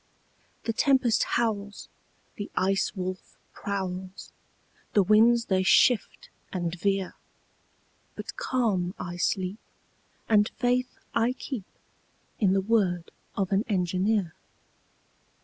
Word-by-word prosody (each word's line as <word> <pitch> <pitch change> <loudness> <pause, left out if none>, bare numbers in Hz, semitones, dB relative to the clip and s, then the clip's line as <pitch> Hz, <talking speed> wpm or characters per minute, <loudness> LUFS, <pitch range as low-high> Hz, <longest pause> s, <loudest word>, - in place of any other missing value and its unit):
The 225 - -1
tempest 255 -2 +3 0.2
howls, 205 -3 -2 0.5
The 205 -1 -6
Ice 195 +3 +1
Wolf 185 0 -5 0.2
prowls, 190 -1 -5 0.6
The 205 - +5
winds 230 +4 +5
they 190 -1 +2
shift 210 +4 +3 0.2
and 175 -3 -2
veer, 195 +1 -1 1.0
But - - -7
calm 220 - 0
I 175 0 -6
sleep, 190 +3 -1 0.7
And 210 -1 +4
faith 250 +1 0 0.2
I 230 +2 +2
keep 255 -6 -6 0.7
In 195 -4 +3
the 195 - +2
word 190 -5 +1 0.3
of 195 -1 0
an 195 +2 +3
engineer. 185 -1 +1
200 Hz, 105 wpm, -27 LUFS, 185-225 Hz, 1.0 s, The